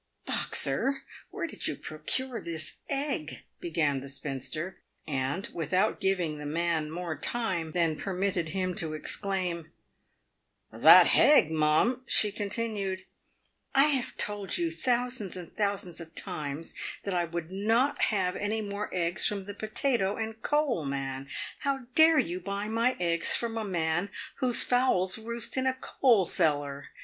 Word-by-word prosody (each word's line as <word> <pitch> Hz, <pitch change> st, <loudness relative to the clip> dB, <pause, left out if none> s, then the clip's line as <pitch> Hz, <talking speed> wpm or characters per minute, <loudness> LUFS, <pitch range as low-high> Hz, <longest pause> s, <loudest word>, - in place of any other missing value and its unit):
" -, -, -43 dB
Boxer, 270 Hz, 0 st, +1 dB, 0.3 s
where -, -, -4 dB
did -, -, -3 dB
you -, -, -1 dB
procure 260 Hz, -3 st, -3 dB
this 160 Hz, -2 st, -3 dB
egg 275 Hz, -, -2 dB
?" -, -, -48 dB
began 155 Hz, -5 st, 0 dB
the 140 Hz, -, -8 dB
spinster; 140 Hz, +5 st, -4 dB, 0.3 s
and, 145 Hz, -, -2 dB
without 185 Hz, +6 st, 0 dB
giving 180 Hz, -6 st, 0 dB
the 150 Hz, -, -7 dB
man 165 Hz, 0 st, 0 dB
more 170 Hz, 0 st, -4 dB
time 185 Hz, -10 st, -2 dB
than 165 Hz, -3 st, +1 dB
permitted 185 Hz, -2 st, -2 dB
him 185 Hz, +1 st, -1 dB
to 155 Hz, -2 st, -1 dB
exclaim, 175 Hz, -1 st, -3 dB, 0.5 s
" -, -, -49 dB, 0.3 s
That -, -, +9 dB
hegg, 285 Hz, -, +5 dB
mum 160 Hz, +12 st, +2 dB
!" -, -, -36 dB
she 210 Hz, -, +5 dB
continued, 205 Hz, -2 st, -2 dB
f -, -, -24 dB, 0.7 s
I 270 Hz, -, +8 dB
have 265 Hz, -4 st, -1 dB
told 205 Hz, -2 st, -1 dB
you 340 Hz, -2 st, 0 dB
thousands 245 Hz, -, -1 dB
and 175 Hz, -2 st, -9 dB
thousands 200 Hz, -5 st, -1 dB
of 165 Hz, 0 st, -12 dB
times 150 Hz, +2 st, -4 dB, 0.3 s
that 200 Hz, -, -3 dB
I 175 Hz, -1 st, +1 dB
would 170 Hz, 0 st, -5 dB
not 225 Hz, +9 st, +2 dB
have 185 Hz, -4 st, 0 dB
any 210 Hz, +2 st, -1 dB
more 205 Hz, 0 st, -4 dB
eggs 175 Hz, +1 st, +1 dB
from 200 Hz, -2 st, -2 dB
the 205 Hz, +1 st, -7 dB
potato 215 Hz, -1 st, 0 dB
and 220 Hz, 0 st, -5 dB
coal 295 Hz, -, +1 dB
man. 135 Hz, -1 st, -4 dB, 0.3 s
How 275 Hz, -1 st, -1 dB
dare 320 Hz, +2 st, +6 dB
you 180 Hz, -, 0 dB
buy 200 Hz, +3 st, -4 dB
my 230 Hz, +3 st, +1 dB
eggs 170 Hz, -1 st, +3 dB
from 230 Hz, -1 st, -2 dB
a 225 Hz, -, -2 dB
man 175 Hz, -1 st, -1 dB, 0.3 s
whose 250 Hz, -2 st, +3 dB
fowls 235 Hz, -6 st, +2 dB
roost 235 Hz, +3 st, -4 dB
in 260 Hz, 0 st, +1 dB
a 260 Hz, -, +1 dB
coal 235 Hz, -10 st, +3 dB
cellar 145 Hz, -3 st, 0 dB
190 Hz, 160 wpm, -29 LUFS, 165-230 Hz, 0.7 s, That